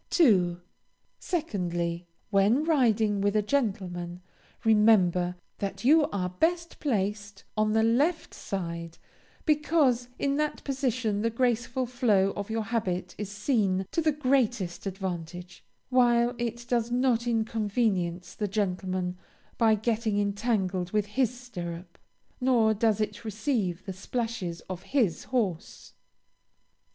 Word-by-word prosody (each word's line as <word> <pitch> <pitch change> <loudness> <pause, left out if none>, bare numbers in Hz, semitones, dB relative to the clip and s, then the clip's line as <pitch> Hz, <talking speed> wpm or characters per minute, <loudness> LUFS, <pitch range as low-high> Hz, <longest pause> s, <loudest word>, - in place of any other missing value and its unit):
2. 185 - +4 0.6
Secondly, 175 - -2 0.2
when 205 +8 +4
riding 225 -10 +2
with 205 +1 +1
a 210 - +3
gentleman, 190 -8 -2 0.4
remember 195 -5 +4 0.2
that 200 +2 -4
you 305 +2 +6
are 185 -3 -2
best 335 - -1
placed 205 -6 -2
on 215 0 +2
the 220 0 +3
left 285 +9 +1
side; 170 -3 -5 0.5
because 295 -5 +2
in 280 0 0
that 300 0 -1
position 255 -6 -1
the 230 - +1
graceful 245 +2 0
flow 220 -6 +2
of 205 +1 -5
your 220 0 -1
habit 185 -5 -2
is 205 -2 -4
seen 205 -3 0
to 330 - +1
the 310 -1 +3
greatest 250 -11 0
advantage, 180 -2 -6 0.3
while 240 -1 +4
it 235 0 -3
does 235 -1 +1
not 245 -1 +1
inconvenience 210 -6 0
the 210 - -2
gentleman 185 -2 -2 0.4
by 225 -2 +5
getting 220 -1 0
entangled 200 -3 0
with 210 -1 +1
his 245 +3 +1
stirrup, 175 -7 -7 0.4
nor 240 -4 +3
does 220 0 +1
it 210 0 -3
receive 215 -5 -2
the 190 - -4
splashes 200 -4 -4
of 185 -1 -7
his 230 - 0
horse. 205 -10 -3
215 Hz, 120 wpm, -28 LUFS, 185-245 Hz, 0.6 s, you